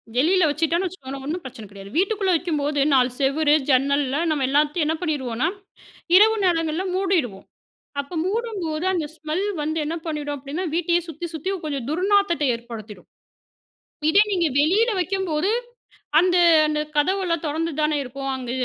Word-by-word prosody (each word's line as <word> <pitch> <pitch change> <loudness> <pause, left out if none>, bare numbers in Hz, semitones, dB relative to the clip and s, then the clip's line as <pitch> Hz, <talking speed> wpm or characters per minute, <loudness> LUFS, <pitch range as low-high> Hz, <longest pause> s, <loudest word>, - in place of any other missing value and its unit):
வெளியில 345 +8 +3
வச்சிட்டோம்ன்னு 330 +5 0
வச்சுக்கோங்களேன், 275 -6 -8
ஒண்ணும் 335 +4 -3
பிரச்சனை 235 -4 -9
கிடையாது. 200 0 -11
வீட்டுக்குள்ள 390 +1 +1
வைக்கும்போது 300 -4 -1
4 255 -2 +4
செவரு, 290 +2 +2 0.2
ஜன்னல்ல 280 +2 +2
நம்ம 295 -3 0
எல்லாத்தையும் 300 +3 +2
என்ன 320 - +1
பண்ணீருவோம்ன்னா, 260 -8 -1 0.7
இரவு 440 +2 +6
நேரங்கள்ல 330 0 +1
மூடிடுவோம். 345 - 0 0.6
அப்ப 280 +5 -7
மூடும்போது, 380 -6 -2
அந்த 330 -5 -1
ஸ்மெல் 315 +5 -3 0.2
வந்து 315 +2 -2
என்ன 320 +3 -3
பண்ணிடும் 295 -2 -3
அப்படீன்னா, 285 +7 -5
வீட்டையே 345 0 +2
சுத்தி 325 +2 -6
சுத்தி 375 +6 -2
கொஞ்சம் 280 -5 -3
துர்நாத்தத்தை 360 -3 +2
ஏற்படுத்திடும். 220 -5 -9 1.0
இதே 405 +5 +6
நீங்க 345 -4 +2
வெளியில 420 +10 +3
வைக்கும்போது, 370 -1 -1 0.7
அந்த 360 0 +2 0.3
அந்த 300 0 0 0.2
கதவெல்லாம் 340 +1 +1
தொறந்து 320 +2 -2
தான 300 -1 +1
இருக்கும். 270 +2 -6
அங்க 250 -2 -6
310 Hz, 140 wpm, -23 LUFS, 280-360 Hz, 1.0 s, இரவு